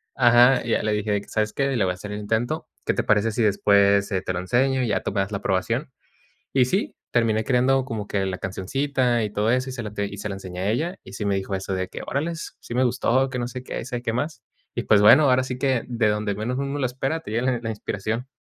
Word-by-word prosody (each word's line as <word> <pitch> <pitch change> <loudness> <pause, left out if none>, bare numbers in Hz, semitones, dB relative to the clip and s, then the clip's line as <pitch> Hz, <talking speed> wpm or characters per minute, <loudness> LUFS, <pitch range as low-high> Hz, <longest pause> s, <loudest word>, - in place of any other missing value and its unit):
Ajá. 120 +1 +6
Y - - -4
ya - - +2
le 110 - 0
dije 105 0 -1
de 100 -1 +1
que: - - -16
"¿Sabes 105 -1 -1
qué? 140 -1 0
Le 110 - +2
voy 95 - +1
a - - -2
hacer 105 +3 -8
el 105 - -4
intento. 115 +9 -1 0.2
¿Qué - - +2
te - - -1
parece 110 +2 +2
si 115 +1 0
después, 100 0 +3
eh, 95 - 0
te 95 - -3
lo 90 - -2
enseño 130 +8 +1
y 120 - 0
ya 105 - 0
tú - - -3
me 100 - 0
das 100 +2 -3
la 100 - -1
aprobación?". 115 +9 -1 0.6
Y 130 -2 +4
sí, 190 - -1
terminé 110 -2 +2
creando 130 +2 +2
como 110 -5 -4
que 100 -2 -1
la 95 -1 -3
cancioncita 120 +6 0
y 105 - -3
todo 105 +1 +1
eso 130 +2 +1
y - - -6
se 125 -2 -5
la 105 -2 -6
te 100 -1 -2
y 100 - -8
se 105 - -4
la 100 - -4
enseñé 90 -2 -7
a 100 - 0
ella. 165 - -1
Y - - -12
sí 105 - -4
me 100 - +1
dijo 95 0 -3
eso 95 0 -3
de 95 0 -2
que: - - -8
"Órales, 165 +4 -3
sí 120 - -8
me 130 - +3
gustó, 125 +1 +2
que 130 -1 -4
no 120 0 -2
sé 125 0 -7
qué, - - -5
sabe 120 -1 -4
qué 115 -2 -1
más". 125 -2 -3 0.3
Y - - -2
pues 105 - +5
bueno, 145 +8 +8
ahora 130 0 +4
sí 130 -1 -5
que 130 -2 +1
de 115 -3 +1
donde 105 -1 0
menos 115 +5 -3
uno 140 +1 -2
lo 130 - +1
espera, 135 +6 -2
te 105 - -9
llega 115 +2 0
la 130 -1 +1
la 115 - -4
inspiración. 110 +3 -3
115 Hz, 285 wpm, -24 LUFS, 100-130 Hz, 0.6 s, bueno